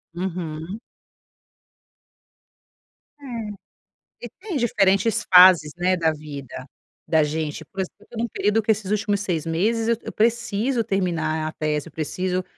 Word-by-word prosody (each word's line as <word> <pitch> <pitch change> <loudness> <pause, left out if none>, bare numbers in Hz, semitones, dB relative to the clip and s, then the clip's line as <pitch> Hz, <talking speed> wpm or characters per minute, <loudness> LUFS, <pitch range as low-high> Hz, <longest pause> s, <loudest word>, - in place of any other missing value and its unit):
Uhum. 175 +1 -5 2.4
É, 230 -6 -6 0.7
e - - -16
tem 375 -6 -4
diferentes 200 -2 +2
fases, 180 -4 +8
né, 185 +1 +2
da 165 -2 +2
vida 140 -4 -8 0.4
da 160 -2 +4
gente, 150 0 -3
por 195 - -9
exemplo, 190 - -3
eu 210 - -20
tô 235 - -10
num 235 +1 0
período 215 0 +1
que 215 - -11
esses 205 -2 +1
últimos 205 -1 0
6 170 -5 -2
meses 220 +8 0
eu 235 - +3
eu - - -6
preciso 235 +1 +1
terminar 160 -5 -1
a - - -3
tese, 155 0 -2
eu - - -12
preciso 180 +4 -2
185 Hz, 145 wpm, -23 LUFS, 160-220 Hz, 2.4 s, fases